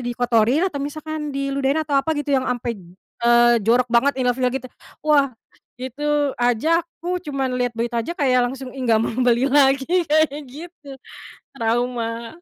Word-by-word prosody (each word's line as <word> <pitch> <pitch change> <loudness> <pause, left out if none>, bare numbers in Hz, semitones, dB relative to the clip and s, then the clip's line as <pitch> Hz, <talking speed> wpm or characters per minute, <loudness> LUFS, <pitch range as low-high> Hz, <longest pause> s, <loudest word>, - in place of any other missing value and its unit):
dikotorin 245 +4 +1
atau 285 - -6
misalkan 300 0 -5
diludahin? 275 +1 0
Atau 295 -2 -3
apa 320 +3 0
gitu, 295 0 -3
yang 260 -1 +1
ampe, 240 -1 -2 0.5
eee, 240 0 +5
jorok 240 +3 +3
banget, 255 +4 +3
ilfil 250 0 +1
gitu. 265 - -4 0.4
Wah, 280 -3 +3 0.5
itu 290 +2 -1
aja 275 +8 +2
aku 350 +2 -5
cuman 270 -3 -2
lihat 245 -1 0
berita 235 0 -1
aja, 340 - -4
kayak 255 -3 +2
langsung, 265 -1 -8
"Ih, 270 - -10
enggak 225 -3 +3
mau - - -1 0.2
beli 245 +2 +3
lagi." 270 -1 +4 0.2
kayak 300 -1 +1
gitu. 315 0 -12 0.7
Trauma. 230 -1 -2
265 Hz, 155 wpm, -21 LUFS, 240-295 Hz, 0.7 s, eee